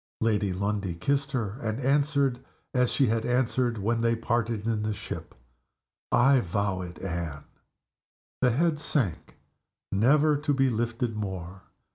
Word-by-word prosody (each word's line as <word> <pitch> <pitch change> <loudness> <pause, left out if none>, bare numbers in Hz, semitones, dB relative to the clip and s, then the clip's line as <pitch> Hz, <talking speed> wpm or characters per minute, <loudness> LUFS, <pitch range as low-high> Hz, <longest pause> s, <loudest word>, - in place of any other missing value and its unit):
Lady 105 -3 +1
Lundie 100 -1 -2
kissed 140 +10 0
her, 115 -3 -2
and 110 -1 -2
answered, 140 -1 +2 0.3
as 125 -1 +2
she 140 - +3
had 115 -1 +1
answered 125 -1 +1
when 115 +3 0
they 115 0 +2
parted 115 -2 -1
in 110 -2 0
the 105 0 -1
ship, - - -7 0.8
"I 135 +2 +5
vow 100 -1 -1
it, 90 -1 -7
Anne!" 85 -5 -4 1.0
The 125 - +5
head 150 +5 +1
sank, 125 - -1 0.6
never 145 +9 +4
to 145 0 0
be 135 -1 +3
lifted 115 0 -1
more. 95 -3 -5
115 Hz, 140 wpm, -27 LUFS, 100-130 Hz, 1.0 s, I